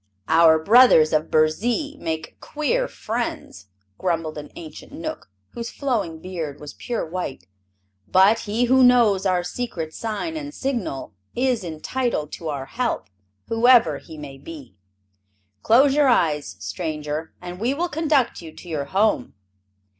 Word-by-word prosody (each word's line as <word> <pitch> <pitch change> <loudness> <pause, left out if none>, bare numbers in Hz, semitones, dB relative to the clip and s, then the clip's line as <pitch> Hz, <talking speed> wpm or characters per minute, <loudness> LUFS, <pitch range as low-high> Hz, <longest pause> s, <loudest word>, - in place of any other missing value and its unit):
"Our 160 -1 +6
brothers 180 -3 +6
of 155 +1 +1
Burzee 235 - +1
make 160 0 -5
queer 485 +13 -1
friends," 220 - -5 0.3
grumbled 165 -3 -1
an 150 - -10
ancient 160 -2 -10
Knook - - -6 0.2
whose 235 0 -5
flowing 225 - -2
beard 160 -5 -5
was 150 -1 -9
pure 240 -2 -3
white. 160 - -5 0.6
"But 195 - +5
he 220 +4 0
who 260 +1 +5
knows 230 -6 +5
our 180 -1 +1
secret 175 -5 -4
sign 230 +9 -4
and 295 -1 -6
signal 240 - -3 0.2
is 250 -3 +1
entitled 165 - -2
to 165 - -7
our 140 -3 -4
help, 230 - -3 0.4
whoever 230 - +4
he 160 - -12
may 140 -2 -9
be. 140 - -10 0.9
Close 265 - +5
your 295 -1 +4
eyes, 150 - +1
stranger, 150 - -4
and 180 0 -8
we 245 +6 0
will 345 +4 0
conduct 300 - +1
you 165 -2 -9
to 175 - -13
your 155 -4 -3
home. 195 - +1
185 Hz, 140 wpm, -23 LUFS, 155-245 Hz, 0.9 s, Our